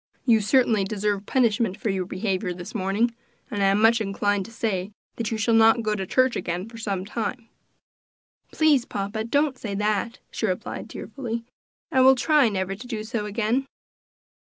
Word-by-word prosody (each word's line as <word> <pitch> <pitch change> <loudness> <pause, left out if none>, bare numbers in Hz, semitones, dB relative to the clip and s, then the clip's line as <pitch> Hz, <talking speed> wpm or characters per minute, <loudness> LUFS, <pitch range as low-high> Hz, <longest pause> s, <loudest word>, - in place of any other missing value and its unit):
You 225 -4 +5
certainly 225 -2 +3
deserve 205 0 -2
punishment 225 -5 +1
for 215 -2 -1
your 185 -2 -2
behavior 185 -2 -2
this 175 0 -9
morning, 205 +5 0 0.4
and 205 -3 -2
I 195 - +4
am 195 +1 +3
much 225 +1 +5
inclined 200 -1 0
to 230 - -12
say 210 -4 -2 0.2
that 230 -2 -2
you 225 - -2
shall 225 +2 +1
not 225 +1 +5
go 215 -1 0
to 195 -3 -3
church 255 +3 +2
again 175 +3 -3
for 230 0 -11
some 195 -4 -2
time." 230 +2 -4 1.0
"Please, 305 -5 +3
papa, 205 +1 -3
don't 280 +2 +1
say 205 -3 -4
that," 210 +3 -1
she 220 - -1
replied 185 -2 -4
tearfully; 235 -4 -5 0.5
"I 260 -4 +4
will 265 +1 +7
try 290 -1 +4
never 190 -1 -2
to 215 +6 -9
do 220 -3 -4
so 215 -2 -3
again." 230 +5 0
220 Hz, 180 wpm, -25 LUFS, 195-235 Hz, 1.0 s, will